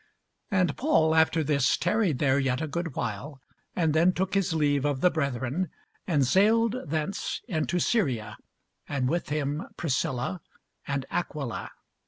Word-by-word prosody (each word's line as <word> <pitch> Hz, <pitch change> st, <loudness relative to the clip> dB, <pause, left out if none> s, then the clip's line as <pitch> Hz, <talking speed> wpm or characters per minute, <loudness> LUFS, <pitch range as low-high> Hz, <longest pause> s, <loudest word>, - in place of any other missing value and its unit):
And 185 Hz, -8 st, +2 dB
Paul 160 Hz, -, +3 dB
after 160 Hz, 0 st, +3 dB
this 140 Hz, -3 st, +2 dB
tarried 180 Hz, -, +1 dB
there 135 Hz, 0 st, +2 dB
yet 130 Hz, -2 st, 0 dB
a 160 Hz, -, -1 dB
good 165 Hz, 0 st, -4 dB
while, 145 Hz, 0 st, -4 dB, 0.4 s
and 160 Hz, -4 st, +2 dB
then 170 Hz, +4 st, +4 dB
took 190 Hz, +2 st, -2 dB
his 195 Hz, -3 st, +1 dB
leave 145 Hz, -3 st, +2 dB
of 145 Hz, -2 st, 0 dB
the 180 Hz, -, +5 dB
brethren, 140 Hz, +3 st, -1 dB, 0.4 s
and 145 Hz, -6 st, +3 dB
sailed 220 Hz, -, +3 dB
thence 155 Hz, +6 st, -2 dB
into 175 Hz, -2 st, -1 dB
Syria, 130 Hz, -, 0 dB, 0.5 s
and 135 Hz, -3 st, 0 dB
with 170 Hz, +5 st, -1 dB
him 145 Hz, 0 st, -1 dB, 0.2 s
Priscilla 135 Hz, +2 st, -1 dB, 0.5 s
and 140 Hz, -2 st, -2 dB
Aquila. 150 Hz, -8 st, -3 dB
155 Hz, 145 wpm, -27 LUFS, 140-180 Hz, 0.5 s, the